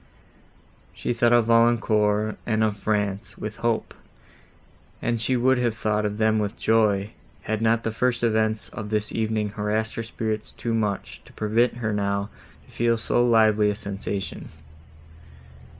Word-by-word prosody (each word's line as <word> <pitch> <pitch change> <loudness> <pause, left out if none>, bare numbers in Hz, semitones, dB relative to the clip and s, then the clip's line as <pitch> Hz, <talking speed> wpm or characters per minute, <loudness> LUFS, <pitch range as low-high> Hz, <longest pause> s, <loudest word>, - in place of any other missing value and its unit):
She - - -2
thought 120 0 +2
of 120 -2 +5
Valancourt 110 -2 +2
and 110 -1 +2
of 110 -2 +1
France, 105 0 -2
with 110 0 -6
hope, 115 -1 -1 1.1
and 115 -1 -1
she 125 +3 +1
would 130 +1 +3
have 120 -2 0
thought 105 -1 0
of 105 0 -5
them 110 0 +2
with 105 +2 -3
joy, 105 -2 +2 0.3
had 110 0 -2
not 115 0 +2
the 115 - -1
first 120 +2 0
events 110 -1 +1
of 105 -2 -7
this 105 0 -1
evening 110 -1 -1
harassed 105 +1 -2
her - - -3
spirits 110 -1 -4
too 115 - -3
much, 105 -3 -2
to - - -17
permit 115 +3 +1
her 110 -3 -2
now 100 0 -1 0.3
to - - -20
feel 115 0 +1
so 120 +2 +1
lively 110 -3 +4
a 105 - -1
sensation. 100 -3 -5
110 Hz, 155 wpm, -24 LUFS, 105-115 Hz, 1.1 s, of